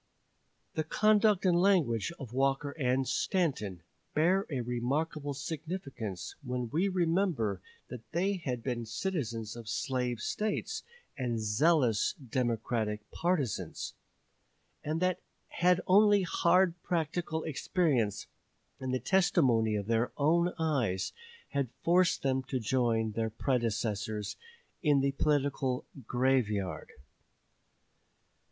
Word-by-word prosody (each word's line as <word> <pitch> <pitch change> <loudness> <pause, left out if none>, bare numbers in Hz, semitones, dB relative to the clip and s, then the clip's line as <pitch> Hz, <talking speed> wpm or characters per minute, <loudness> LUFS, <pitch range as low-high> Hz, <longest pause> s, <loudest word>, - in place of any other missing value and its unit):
" - - -44
The 155 - -1
conduct 210 +3 +3
and 180 -2 +4
the - - +3
language 170 - +2
of 125 -4 -8
Walker 135 +2 +1
and 130 -2 0
Stanton 110 - -1 0.3
bear 185 +6 +3
a 135 -5 -2
remarkable 140 +5 -2
significance 135 - -5
when 125 -3 -3
we 170 +7 +2
remember 165 - +1 0.3
that 120 -3 -10
they 190 +4 +1
had 125 -8 -4
been 120 -3 -3
citizens 115 - -3
of 115 -3 -8
slave 125 0 -1
States 210 - -2 0.3
and 120 -5 -2
zealous 115 +1 +3
Democratic 115 -4 -2
partisans, 140 - -1 0.9
and 155 +3 -2
that 185 -1 +1 0.7
only 205 +1 +5
hard 175 0 +3
practical 160 -1 -1
experience 140 - 0 0.5
and 130 -1 -3
the 130 - 0
testimony 125 - +3
of 100 -1 -2
their 115 +2 +1
own 170 +4 +3
eyes 130 - 0 0.4
had 140 -3 -1
forced 175 +1 +3
them 130 -1 +1
to 130 0 -2
join 115 -1 +1
their 110 +1 -1
predecessors 110 -4 -1 0.5
in 145 -5 +4
the 140 0 +2
political 135 -3 0 0.2
"graveyard." 120 -7 0
135 Hz, 110 wpm, -31 LUFS, 115-165 Hz, 0.9 s, only